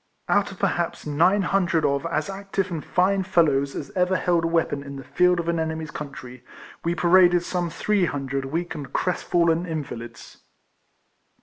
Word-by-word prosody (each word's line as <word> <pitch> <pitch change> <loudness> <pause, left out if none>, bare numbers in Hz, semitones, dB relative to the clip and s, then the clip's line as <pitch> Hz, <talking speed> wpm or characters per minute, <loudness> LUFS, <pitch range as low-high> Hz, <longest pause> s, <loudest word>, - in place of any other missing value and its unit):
Out 205 -1 +2
of 190 - -11
perhaps 175 -3 -1
nine 175 +7 +3
hundred 175 -3 +1
of 140 +3 0
as 155 -2 -1
active 195 -1 -3
and 160 -4 -4
fine 190 +2 +2
fellows 150 -7 +2
as 140 - -6
ever 185 0 +1
held 170 -2 +1
a - - +2
weapon 165 -4 0
in 140 0 -8
the 135 - -8
field 180 +3 +2
of 170 - -3
an 170 -1 0
enemy's 160 -1 -3
country, 125 -4 -8 0.4
we 170 +1 0
paraded 175 0 +5
some 175 -1 -2
three 200 +3 +1
hundred 135 -3 -3
weak 165 +6 -3
and 145 -2 -7
crest 180 - -1
fallen 170 0 +2
invalids. 120 -8 -7
170 Hz, 175 wpm, -24 LUFS, 145-180 Hz, 0.4 s, paraded